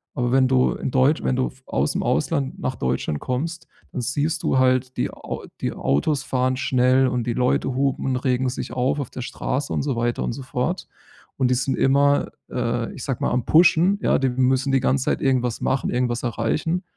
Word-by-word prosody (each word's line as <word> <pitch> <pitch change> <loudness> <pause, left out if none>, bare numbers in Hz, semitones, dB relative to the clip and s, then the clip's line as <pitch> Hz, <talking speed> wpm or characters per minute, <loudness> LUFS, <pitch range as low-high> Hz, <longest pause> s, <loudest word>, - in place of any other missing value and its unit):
Aber 120 -1 0
wenn 130 0 +4
du 130 -1 +3
in - - -4
Deutsch 130 +4 +3
wenn 125 - +1
du 130 0 +1 0.2
aus'm 70 +2 0
Ausland 135 - 0
nach 130 - -2
Deutschland 65 - -2
kommst, 165 - -3 0.2
dann 125 - -3
siehst 145 +6 -1
du - - +1
halt 130 0 +2
die - - -1
Au - - -7 0.2
die - - -1
Autos 135 - 0
fahren 130 -1 0
schnell 130 0 +3
und 125 -2 -2
die 120 - 0
Leute 125 +1 0
hupen 135 0 0
und 130 - +1
regen 130 0 0
sich 125 - -5
auf 130 +3 0
auf 140 - -5
der 125 - -6
Straße 135 +3 -3
und - - 0
so 140 -3 -1
weiter 120 +1 -1
und - - -2
so 135 - -7
fort. 130 +7 -3 0.5
Und 130 -2 +3
die - - +3
sind 130 +2 -1
immer, 140 +1 +3 0.2
äh, 120 -1 -1
ich - - -8
sage 135 -4 -3
mal, - - +2
am 125 -1 0
pushen. 175 +4 +4
Ja, - - +3
die 135 -1 +1
müssen 130 +2 +1
die 135 - +3
ganze 130 +1 +1
Zeit - - 0
irgendwas 125 -3 0
machen, 135 - 0
irgendwas 120 -1 -1
erreichen. 125 - -1
130 Hz, 210 wpm, -23 LUFS, 125-135 Hz, 0.5 s, wenn